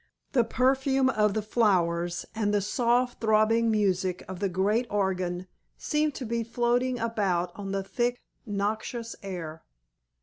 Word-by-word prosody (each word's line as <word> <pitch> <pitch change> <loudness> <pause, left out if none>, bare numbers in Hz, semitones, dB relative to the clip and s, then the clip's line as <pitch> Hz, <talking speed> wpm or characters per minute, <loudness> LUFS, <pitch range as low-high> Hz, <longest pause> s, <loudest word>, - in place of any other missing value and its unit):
The 245 -4 +4
perfume 265 +2 +2
of 210 -2 +2
the 215 - 0
flowers, 175 -6 +1
and 210 -2 0
the 205 - +3
soft 240 +4 +1
throbbing 225 +1 +3
music 190 -4 +1
of 185 -1 -7
the 200 -1 0
great 205 +7 +1
organ 185 -3 -1 0.3
seemed 300 -1 0
to 260 - -5
be 230 0 -1
floating 240 +2 +1
about 200 -7 0
on 195 -1 -5
the 195 0 -1
thick, 245 +4 -1 0.2
noxious 220 +2 -3
air. 165 -5 -6
215 Hz, 140 wpm, -28 LUFS, 190-240 Hz, 0.3 s, The